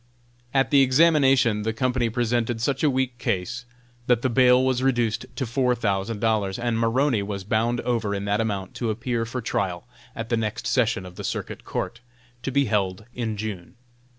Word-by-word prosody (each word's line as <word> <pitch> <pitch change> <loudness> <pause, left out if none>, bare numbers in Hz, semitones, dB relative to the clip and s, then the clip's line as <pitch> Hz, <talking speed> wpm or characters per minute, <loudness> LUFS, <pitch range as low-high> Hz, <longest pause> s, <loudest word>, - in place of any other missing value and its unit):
At 135 -1 +2
the 140 -2 +6
examination 135 -5 +4
the 110 +1 -1
Company 125 0 0
presented 120 0 0
such 135 +4 -1
a 150 - +5
weak 130 -2 -1
case 115 +7 -2 0.4
that 120 -2 +3
the 130 - +1
bail 125 +1 +5
was 130 -1 +1
reduced 120 -2 0
to 130 - -2
four 125 +1 +1
thousand 105 -1 -1
dollars, 105 -4 0
and 120 -1 -1
Maroney 115 +1 +2
was 100 -1 -4
bound 115 +4 0
over 115 -4 -1
in 100 0 -3
that 100 +2 +1
amount 100 -4 -3
to 120 - -1
appear 115 +1 -2
for 125 +2 -4
trial 95 -3 -2 0.3
at 115 0 -5
the 115 - +1
next 110 -2 -3
session 115 -7 +1
of 90 0 -11
the - - -6
circuit - - -4
court, 115 - -4 0.4
to 130 - -3
be 140 +1 +2
held 100 -2 -1
in 110 -3 -3
June. 100 -5 -6
115 Hz, 185 wpm, -24 LUFS, 105-125 Hz, 0.4 s, the